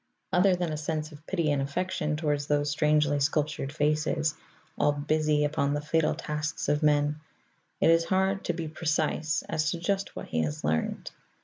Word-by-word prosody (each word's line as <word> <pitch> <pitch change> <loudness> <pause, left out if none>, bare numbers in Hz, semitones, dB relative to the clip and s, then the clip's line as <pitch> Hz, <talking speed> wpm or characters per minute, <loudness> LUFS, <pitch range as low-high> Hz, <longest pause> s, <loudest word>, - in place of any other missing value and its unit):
Other 180 +1 +5
than 175 -3 -2
a - - -3
sense 155 0 -3
of 150 0 -13
pity 170 -6 0
and 140 -1 +1
affection 150 +1 -1
toward 150 -2 0
those 145 +1 0
strangely 150 -1 +2
sculptured 145 -1 0
faces, 155 +1 +1 0.4
all 145 - +2
busy 150 0 +1
upon 145 -1 0
the - - 0
fatal 155 +1 +1
tasks 150 0 -3
of 145 +1 +2
men, 150 0 +2 0.6
it - - +5
is 165 0 +4
hard 190 +1 +1
to 175 - 0
be 165 -1 -4
precise 155 -1 -1
as 155 0 0
to 170 - -3
just 195 +3 -1
what - - -7
he 80 - 0
has 75 -1 -3
learned. 80 +1 -1
150 Hz, 180 wpm, -28 LUFS, 145-160 Hz, 0.6 s, Other